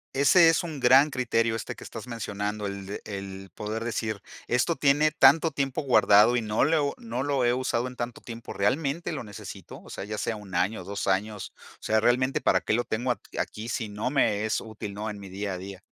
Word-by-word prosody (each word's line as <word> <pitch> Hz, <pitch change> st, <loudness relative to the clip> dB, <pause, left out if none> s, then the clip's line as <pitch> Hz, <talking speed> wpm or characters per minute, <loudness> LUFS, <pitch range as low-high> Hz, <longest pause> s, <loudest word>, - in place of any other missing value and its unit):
ese 165 Hz, +5 st, +6 dB
es 165 Hz, -, +3 dB
un 160 Hz, -4 st, -6 dB
gran 135 Hz, +4 st, +6 dB
criterio 115 Hz, -3 st, 0 dB
este 115 Hz, -, -5 dB
que -, -, -12 dB
estás -, -, -8 dB
mencionando, 105 Hz, -3 st, -4 dB
el 100 Hz, -1 st, -6 dB
de 100 Hz, -, -6 dB
el 95 Hz, -1 st, -7 dB
poder 110 Hz, +2 st, -4 dB
decir: 110 Hz, -3 st, -3 dB, 0.2 s
"Esto 125 Hz, +8 st, +1 dB
tiene 145 Hz, +1 st, +3 dB
tanto 155 Hz, +2 st, +5 dB
tiempo 135 Hz, -2 st, -2 dB
guardado 120 Hz, -4 st, +5 dB
y 120 Hz, -, 0 dB
no 105 Hz, 0 st, +1 dB
lo 155 Hz, +4 st, +2 dB
he -, -, +3 dB
u 140 Hz, -1 st, 0 dB
no 120 Hz, +3 st, -4 dB
lo 140 Hz, -3 st, 0 dB
he 120 Hz, -, +3 dB
usado 125 Hz, -1 st, -1 dB
en 125 Hz, -, -9 dB
tanto 120 Hz, -1 st, -5 dB
tiempo, 115 Hz, -1 st, -8 dB
¿realmente 140 Hz, +11 st, 0 dB
lo 150 Hz, -, -4 dB
necesito?, 105 Hz, -1 st, -10 dB
o -, -, -15 dB
sea, -, -, -6 dB
ya 105 Hz, +1 st, -5 dB
sea 115 Hz, -, -1 dB
1 105 Hz, -3 st, -11 dB
año, 90 Hz, +3 st, 0 dB
2 100 Hz, +2 st, -4 dB
años. 100 Hz, +1 st, -1 dB, 0.3 s
O -, -, -25 dB
sea, 110 Hz, 0 st, +2 dB
realmente, 130 Hz, +3 st, +2 dB
¿para -, -, +3 dB
qué -, -, -1 dB
lo 120 Hz, -, +2 dB
tengo 120 Hz, +3 st, -2 dB
aq 120 Hz, -, 0 dB, 0.2 s
aquí 110 Hz, +1 st, -4 dB
si 115 Hz, -3 st, -3 dB
no 105 Hz, +5 st, -3 dB
me 105 Hz, -7 st, +2 dB
es 110 Hz, -, 0 dB
útil?, 110 Hz, -2 st, -7 dB
¿no?, 105 Hz, +2 st, -4 dB
en 105 Hz, -, -7 dB
mi 100 Hz, -1 st, -10 dB
día 100 Hz, +1 st, -4 dB
a -, -, -4 dB
día". 95 Hz, 0 st, -9 dB
115 Hz, 235 wpm, -27 LUFS, 105-130 Hz, 0.3 s, ese